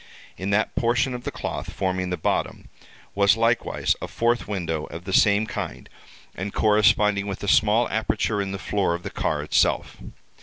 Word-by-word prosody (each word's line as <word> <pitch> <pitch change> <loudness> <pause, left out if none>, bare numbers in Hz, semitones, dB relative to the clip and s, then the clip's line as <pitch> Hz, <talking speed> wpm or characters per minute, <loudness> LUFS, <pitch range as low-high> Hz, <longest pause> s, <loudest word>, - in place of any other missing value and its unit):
In 95 +3 -4
that 105 +2 +1
portion 120 +2 +1
of 125 0 -7
the - - -2
cloth - - -5
forming 95 -1 -2
the 90 - -2
bottom, 80 - -2 0.4
was 100 +1 +4
likewise, 115 +1 +1
a - - -4
fourth 120 +1 0
window, 85 -6 -3
of 85 - -9
the 95 - -5
same 105 +2 +4
kind, 65 - -6 0.5
and 95 +2 -5
corresponding 105 -1 +3
with 100 0 -5
a - - -3
small 110 +4 +4
aperture 110 -1 0
in 100 -1 -3
the 100 - -4
floor 100 -3 0
of 85 - -8
the - - -6
car - - -1
itself. - - +1
100 Hz, 180 wpm, -24 LUFS, 95-110 Hz, 0.5 s, was